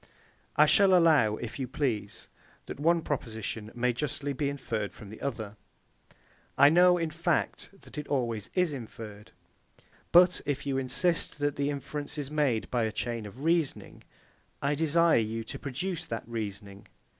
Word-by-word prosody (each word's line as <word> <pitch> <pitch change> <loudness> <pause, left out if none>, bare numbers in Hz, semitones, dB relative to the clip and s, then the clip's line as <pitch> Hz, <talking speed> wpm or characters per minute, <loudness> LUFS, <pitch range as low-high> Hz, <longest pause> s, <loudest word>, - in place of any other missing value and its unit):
I - - +7
shall 195 -3 +5
allow, 150 -11 +4
if 115 +3 -7
you 130 - -2
please, 115 -7 -2 0.4
that - - -7
the - - -10
one 170 +1 +3
proposition 110 -5 -4
may 120 0 +1
justly 145 +2 -3
be 140 +1 -1
inferred 115 -7 -3
from 105 - -12
the 110 - -11
other: 110 -6 -4 1.0
I 140 - +8
know, 180 +2 +6
in 165 -2 -2
fact, 165 +2 -1
that 150 - -9
it 150 - -6
always 115 -7 -1
is 180 -4 +2
inferred. 110 -4 -9 0.8
But 180 +1 +6
if 140 -1 -2
you 135 -1 0
insist 165 +6 0
that 145 -1 0
the 140 0 0
inference 145 +1 -4
is 145 -1 -4
made 140 -7 +1
by 120 -2 +1
a 110 - -1
chain 115 -1 -3
of 125 +8 -11
reasoning, 165 -3 0 0.6
I 140 +1 0
desire 160 0 +3
you 115 +1 -2
to - - -8
produce 165 +6 -3
that 115 -6 -5
reasoning. 100 -3 -6
140 Hz, 165 wpm, -29 LUFS, 115-155 Hz, 1.0 s, I